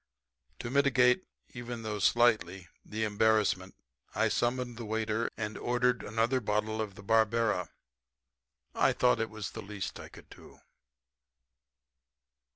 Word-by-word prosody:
To 120 - -6
mitigate, 130 +1 +3 0.3
even 120 -1 -7
though 105 -1 -3
slightly, 105 -6 +2 0.2
the 110 +1 -4
embarrassment 105 -3 +1 0.4
I - - +2
summoned 120 0 -1
the 120 - -6
waiter 110 +1 -1
and 110 0 -4
ordered 125 0 +1
another 115 +4 0
bottle 105 +1 -1
of 105 -3 -5
the 100 - -12
Barbera. 110 -2 +2 1.1
I - - +3
thought 125 -2 +3
it 110 - -2
was 110 -2 -6
the 110 - -7
least 100 -4 -6
I - - -9
could - - -15
do. - - -15
110 Hz, 130 wpm, -30 LUFS, 105-120 Hz, 1.1 s, mitigate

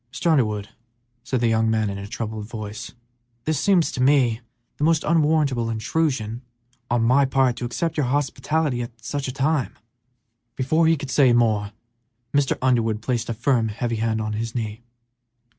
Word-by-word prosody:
"Mr. 125 +8 0
Underwood," 105 -8 +1 0.5
said 125 -1 -1
the 120 - +3
young 115 0 +2
man, 110 -1 +1
in 100 0 -4
a 100 - -7
troubled 110 -1 -5
voice, 110 -1 -7 0.5
"this 155 -3 0
seems 185 -3 +3
to 125 - -3
me 130 -4 +3 0.4
the - - -3
most 160 0 +3
unwarrantable 150 -7 +2
intrusion 115 0 -1 0.5
on 120 -1 +2
my 130 +4 +4
part 130 -2 +2
to 120 - -3
accept 160 +8 -2
your 145 -4 +1
hospitality 145 0 0
at 120 - -4 0.2
such 140 +3 -3
a - - -2
time 140 0 -1 0.4
" 115 -1 -52
Before 155 +5 +2
he 165 0 +4
could 140 -2 -6
say 130 -4 +5
more, 110 -4 +2 0.6
Mr. 140 -1 +2
Underwood 115 -4 +1
placed 120 -2 -1
a - - 0
firm, 120 0 +1
heavy 115 +2 -2
hand 110 0 0
on 110 0 -2
his 115 +2 -4
knee. 110 -1 -4
120 Hz, 175 wpm, -23 LUFS, 110-140 Hz, 0.6 s, say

